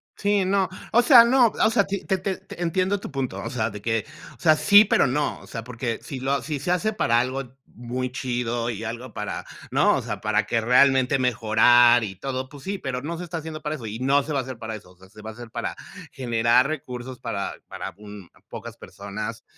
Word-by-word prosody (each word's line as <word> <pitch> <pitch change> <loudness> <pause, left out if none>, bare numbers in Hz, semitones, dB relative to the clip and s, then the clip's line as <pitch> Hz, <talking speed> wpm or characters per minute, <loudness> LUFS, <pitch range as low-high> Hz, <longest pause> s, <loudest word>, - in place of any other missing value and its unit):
Sí, 205 -2 +1
no, 190 0 +1 0.2
o 240 - +6
sea, 240 -2 +8
no, 245 0 +5
o 220 +1 +2
sea, 205 -4 +3
te 200 -1 -4
te 190 -1 +1
te 190 -2 -5
entiendo 185 +4 0
tu - - -8
punto, 135 -2 -3
o - - -5
sea, 110 -5 -2
de 105 0 -8
que, 115 -1 -1 0.3
o - - -37
sea, 155 -2 +5
sí, 205 +7 +7
pero 140 - +3
no, 145 +4 -1
o - - -15
sea, 115 - -6
porque 120 0 -4
si 135 - -6
lo 135 +1 0
si 150 -1 -3
se 175 +6 -2
hace 215 +4 +1
para 120 - +2
algo 130 +1 -3
muy 125 +1 -5
chido, 120 -2 -2
¿y 110 -1 -5
algo 115 +2 -6
para, 105 -2 -4 0.3
no? - - +3
O - - -2
sea, - - -5
para 105 0 +1
que 115 0 0
realmente 130 +2 +4
mejorar 120 0 +5
y 95 -3 -5
todo, 130 +5 -4
pues 140 -1 -13
sí, 200 +4 -3
pero 130 -7 -4
no 165 +4 -4
se 180 - -6
está 170 -1 -5
haciendo 155 -1 -7
para 150 0 -2
eso 115 -7 -8
y 110 +3 -6
no 140 +2 +3
se 150 +1 -5
va 140 - +1
a 130 - -2
hacer 130 -2 -8
para 110 -1 -5
eso, 100 -4 -12
o 90 - -22
sea, 95 0 -18
se 105 0 -14
va 110 - -6
a - - -12
hacer 120 0 -10
para 120 0 -4 0.4
generar 120 0 +2
recursos 125 -4 -6
para 105 -5 -4
para - - -6
un 105 -3 -11 0.2
pocas - - -8
personas, 105 +3 -7
125 Hz, 235 wpm, -24 LUFS, 115-155 Hz, 0.4 s, sea